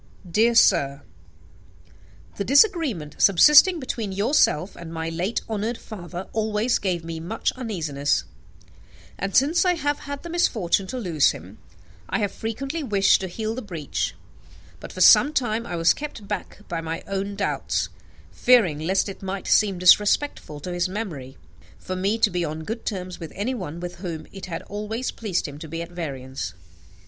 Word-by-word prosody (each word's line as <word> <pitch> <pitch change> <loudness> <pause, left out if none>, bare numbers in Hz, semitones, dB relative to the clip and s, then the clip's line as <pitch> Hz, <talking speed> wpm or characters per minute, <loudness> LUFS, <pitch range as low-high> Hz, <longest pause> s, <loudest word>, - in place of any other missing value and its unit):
*/ 175 - -16
"Dear 230 +6 +3
Sir, 145 -10 +4 1.3
"The - - -1
disagreement 280 - +2
subsisting 300 - +7
between 230 -6 -4
yourself 200 - +2
and 170 -1 -9
my 165 0 -3
late 175 +7 -2
honoured 220 +1 -2
father 180 -3 -8
always 220 +2 +1
gave 175 -4 -2
me 165 -1 -5
much 175 +8 -2
uneasiness; 160 - -1 1.0
and, 195 0 -3
since 295 +9 +4
I 360 -1 +3
have 290 -2 -1
had 285 -1 -7
the 340 - -7
misfortune 205 - +1
to 255 - -5
lose 170 - +2
him, - - -12 0.5
I - - 0
have 205 -3 -1
frequently 270 +10 -4
wished 205 -9 +3
to 190 - -3
heal 215 +4 -3
the 255 - -5
breach: 170 - -3 0.6
but, - - -9
for - - -6
some 295 - +7
time, 235 -4 -1
I 175 - -4
was 165 0 +4
kept 285 -9 -8
back 210 - -6
by 170 -1 -3
my 165 +1 -5
own 195 +1 -3
doubts, 200 - -1 0.4
fearing 210 -12 +4
lest 185 +6 +1
it 195 - -8
might 190 0 -4
seem 200 -3 +3
disrespectful 180 - +3
to 180 +4 -5
his 175 +1 0
memory 165 - -6 0.4
for 185 - -5
me 195 +4 0
to 220 -2 +3
be 175 -1 -1
on 155 0 -4
good 225 +7 -6
terms 185 -4 -4
with 165 - -7
anyone 200 - -3
with 175 0 -6
whom 170 -4 -6
it 195 -1 -8
had 165 -2 -5
always 210 +5 -4
pleased 195 -7 -2
him 145 0 -9
to 160 - -8
be 165 +2 -5
at 170 +1 -6
variance." 135 - -5
195 Hz, 170 wpm, -24 LUFS, 170-230 Hz, 1.3 s, subsisting